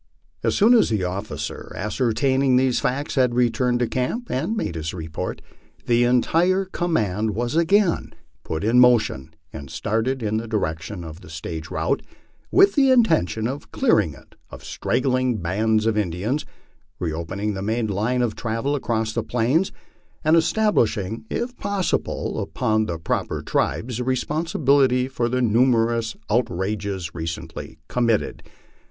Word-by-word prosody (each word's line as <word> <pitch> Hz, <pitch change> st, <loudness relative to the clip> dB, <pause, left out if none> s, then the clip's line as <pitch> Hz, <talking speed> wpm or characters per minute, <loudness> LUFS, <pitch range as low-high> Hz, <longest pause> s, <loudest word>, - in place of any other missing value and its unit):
As -, -, +1 dB
soon 220 Hz, +4 st, +5 dB
as 235 Hz, -, +5 dB
the 105 Hz, -4 st, 0 dB
officer 95 Hz, +4 st, -5 dB
ascertaining 130 Hz, -, +1 dB
these 130 Hz, -1 st, +3 dB
facts 140 Hz, +4 st, -1 dB
had 125 Hz, -3 st, +2 dB
returned 125 Hz, 0 st, +2 dB
to 120 Hz, -, +2 dB
camp 130 Hz, -, -2 dB
and 180 Hz, -, -1 dB
aiade 150 Hz, -, -2 dB
his 80 Hz, +1 st, -4 dB
report, 80 Hz, -2 st, -5 dB, 0.4 s
the 120 Hz, 0 st, +3 dB
entire 170 Hz, +10 st, +2 dB
command 110 Hz, -, -1 dB
was 120 Hz, +4 st, -2 dB
again 175 Hz, +2 st, +2 dB, 0.3 s
put 80 Hz, 0 st, -4 dB
in 115 Hz, +4 st, +4 dB
motion 110 Hz, -, +3 dB, 0.2 s
and 70 Hz, -3 st, -8 dB
started 115 Hz, -, -1 dB
in 110 Hz, 0 st, 0 dB
the 115 Hz, +1 st, -4 dB
direction 90 Hz, -3 st, -3 dB
of 80 Hz, +2 st, -9 dB
the 90 Hz, -, -13 dB
stage 80 Hz, +1 st, -6 dB
route, -, -, -1 dB, 0.5 s
with 390 Hz, +1 st, +5 dB
the 275 Hz, -3 st, +4 dB
intention 160 Hz, -, +3 dB
of 135 Hz, +3 st, -6 dB
clearing -, -, +2 dB
it -, -, -18 dB, 0.2 s
of -, -, -11 dB
straggling 130 Hz, -2 st, 0 dB
bands 105 Hz, +5 st, +1 dB
of 115 Hz, -1 st, +2 dB
Indians, 105 Hz, -, -1 dB, 0.5 s
reopening 85 Hz, +5 st, -3 dB
the 95 Hz, -, -4 dB
main 110 Hz, +3 st, 0 dB
line 110 Hz, +5 st, 0 dB
of 115 Hz, -3 st, -1 dB
travel 115 Hz, +5 st, -2 dB
across 115 Hz, -5 st, -1 dB
the 115 Hz, -, 0 dB
Plains, 125 Hz, -, +1 dB, 0.5 s
and 155 Hz, +1 st, +4 dB
es 165 Hz, -1 st, +3 dB
tablishing 115 Hz, -, +1 dB
if 245 Hz, +1 st, -3 dB
possible 200 Hz, -2 st, -1 dB
upon 110 Hz, 0 st, 0 dB
the 85 Hz, -, -3 dB
proper 80 Hz, -, -2 dB
tribes 120 Hz, 0 st, -1 dB
the -, -, -1 dB
responsibility 135 Hz, -1 st, +2 dB
for 120 Hz, -3 st, -1 dB
the 125 Hz, +1 st, 0 dB
numerous 115 Hz, -1 st, +2 dB
outrages 100 Hz, -4 st, -1 dB
recently 80 Hz, -1 st, -6 dB
committed. 115 Hz, -3 st, 0 dB
115 Hz, 145 wpm, -23 LUFS, 105-130 Hz, 0.5 s, soon